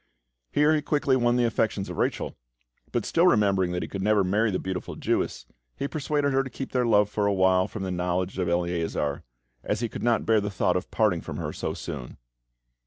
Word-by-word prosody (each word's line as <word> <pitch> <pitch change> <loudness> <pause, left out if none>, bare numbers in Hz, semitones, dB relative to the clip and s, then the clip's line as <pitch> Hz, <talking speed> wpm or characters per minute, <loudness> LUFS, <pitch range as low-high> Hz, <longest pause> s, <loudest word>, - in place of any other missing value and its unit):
Here 150 +1 +4
he 155 - +2
quickly 145 -2 +1
won 120 -1 +2
the 125 -1 +3
affections 110 -3 0
of - - -7
Rachel; - - -1 0.6
but, 120 -3 -1
still 170 +2 +3
remembering 100 - +3
that 90 - -2
he - - -4
could 100 - -5
never 105 0 +3
marry 105 +5 +2
the 95 - 0
beautiful 95 -1 -4
Jewess, - - -1 0.3
he 140 - -2
persuaded 145 -1 -1
her 135 - +3
to 135 - -5
keep 135 - -6
their 125 -2 +1
love 105 -2 +4
for 105 0 0
awhile 95 -2 +3
from 105 - -6
the 95 - -3
knowledge 90 +1 -1
of 90 -2 0
Eleazar, 85 -4 -1 0.4
as 105 +2 -1
he 120 - -1
could - - -7
not 120 -2 +2
bear 110 -2 +3
the 100 - -2
thought 95 - +1
of - - -2
parting - - +1
from - - -6
her - - -4
so - - -3
soon. - - -7
105 Hz, 215 wpm, -26 LUFS, 95-125 Hz, 0.6 s, Here